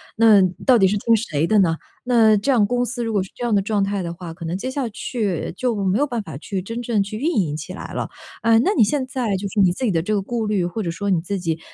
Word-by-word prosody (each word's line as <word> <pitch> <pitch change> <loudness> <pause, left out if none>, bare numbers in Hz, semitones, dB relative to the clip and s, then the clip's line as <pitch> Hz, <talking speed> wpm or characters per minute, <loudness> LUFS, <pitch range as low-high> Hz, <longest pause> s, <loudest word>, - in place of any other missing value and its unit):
那 220 -3 +6 0.2
到 255 -2 +6
底 195 -3 +5
是 205 - 0
听 230 - +2
谁 160 -9 -1
的 215 - +3
呢？ 170 -4 +3 0.3
那 225 -4 +4
这 275 +8 0
样 230 -6 +4
公 245 +3 0
司 245 0 -4
如 225 - -2
果 205 - +1
是 185 - -12
这 245 - -7
样 235 - 0
的 200 - +4
状 205 0 0
态 200 0 -1
的 170 -1 -4
话， 170 -1 -8
可 165 - -9
能 165 +2 -2
接 245 +7 -4
下 260 -2 -2
去 210 -5 -3
就 250 -3 0
没 190 +1 +2
有 290 - +3
办 240 -4 -2
法 165 -9 -8
去 190 +4 -4
真 230 +5 -5
正 230 -3 0
去 210 +2 -6
运 320 +8 -1
营 155 -7 0
起 160 +4 -7
来 - - -8
了。 - - -2 0.4
哎， 225 0 +5
那 390 - +2
你 235 - +6
现 260 +5 0
在 245 -6 -1
就 195 +2 -3
是 215 - -2
你 185 -3 +5
自 260 - -6
己 235 - +2
的 165 -3 +1
这 210 +6 -2
个 205 - +1
顾 230 +3 -3
虑， 205 -3 +1
或 175 +6 -3
者 170 - -2
说 200 +4 -3
你 185 -3 +3
自 195 +3 -3
己， 165 -2 -2
205 Hz, 320 characters per minute, -21 LUFS, 185-235 Hz, 0.4 s, 那